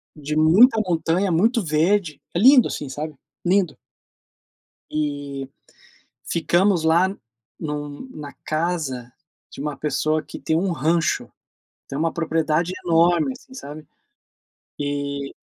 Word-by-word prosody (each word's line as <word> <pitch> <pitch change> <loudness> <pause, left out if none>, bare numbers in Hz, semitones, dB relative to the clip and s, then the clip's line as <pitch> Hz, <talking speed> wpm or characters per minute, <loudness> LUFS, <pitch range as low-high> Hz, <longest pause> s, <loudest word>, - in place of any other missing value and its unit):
de 150 0 -4
muita 200 - +6
montanha, 175 +2 +1
muito 225 +7 +2
verde. 165 +1 +1
É - - +2
lindo, 255 +2 +7
assim, 145 - -5
sabe. 150 +3 -5 0.3
Lindo. 185 -1 +2 1.2
E 145 -3 -3 0.7
ficamos 175 +1 +2
lá 170 +4 +4
em 115 - -11
um 145 - -5
na 145 -2 -8
casa 155 -7 -2 0.4
de - - -11
uma 150 0 -3
pessoa 155 +1 0
que - - -9
tem 160 - 0
um 185 +1 0
rancho, 165 +1 0 0.6
tem 135 - -4
uma 165 +1 0
propriedade 165 +1 0
enorme 170 +6 +3
assim, 260 0 -15
sabe. 150 - -9 0.9
E 140 -1 -3
160 Hz, 120 wpm, -22 LUFS, 145-175 Hz, 1.2 s, lindo